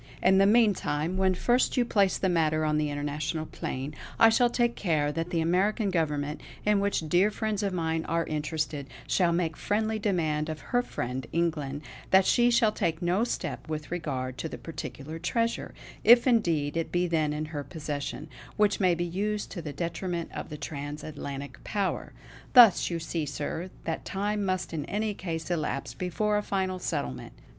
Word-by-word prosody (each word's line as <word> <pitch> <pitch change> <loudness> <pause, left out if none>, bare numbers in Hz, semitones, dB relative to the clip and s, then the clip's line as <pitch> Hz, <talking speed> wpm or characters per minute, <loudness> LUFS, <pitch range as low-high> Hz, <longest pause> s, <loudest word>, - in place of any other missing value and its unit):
In 190 +1 +5
the 195 - +6
meantime, 185 -8 +2
when 190 0 +2
first 245 +8 +2
you 245 - +4
place 200 -4 +2
the 190 - 0
matter 155 -3 +2
on 150 0 +2
the 150 -1 0
international 150 +2 -2
plane, 135 -1 -5 0.2
I 225 - +8
shall 240 +2 +4
take 240 0 +1
care 155 -6 +1
that 165 +3 -3
the 170 -2 0
American 195 +5 +1
government, 150 -3 -1 0.2
in 210 -1 +4
which 200 -5 0
dear 180 +6 +4
friends 215 -1 -2
of 200 -1 0
mine 160 -2 -1
are 165 0 0
interested, 150 -2 -2 0.2
shall 175 -3 +2
make 170 -2 0
friendly 220 +1 0
demand 160 -7 0
of 155 -1 -4
her 245 - +5
friend, 125 - -4
England, 150 -4 -1 0.3
that 190 0 +6
she 240 0 +4
shall 235 -2 +4
take 165 -5 -1
no 180 +5 +2
step 240 - -4
with 155 0 -4
regard 130 -7 -3
to 160 - -3
this - - -7
particular 160 -1 -7
treasure 230 +6 -1 0.3
if 240 +1 +8
indeed 170 - +2
it 165 -1 -2
be 175 0 +2
then 160 -3 +1
in 150 +1 -2
her 145 -1 -3
possession 150 -1 -5 0.3
which 210 -2 +3
may 185 -3 +4
be 175 +1 -1
used 205 +4 -2
to 180 -2 -5
the 155 -2 -5
detriment 170 +2 -3
of - - -6
the 150 - -6
trans 145 0 -6
Atlantic 140 -3 -7
power. 200 -2 -2 0.4
Thus 240 -7 +8
you 170 - -1
see, 160 -1 -3
sir, 150 +5 -4
that 165 - -3
time 205 +1 -1
must 185 -2 -1
in 155 -3 -2
any 210 +3 -1
case 165 -3 -4
elapse 140 -7 -2
before 195 - 0
a - - +1
final 190 -2 -1
settlement. 65 - -3
170 Hz, 185 wpm, -28 LUFS, 150-200 Hz, 0.4 s, I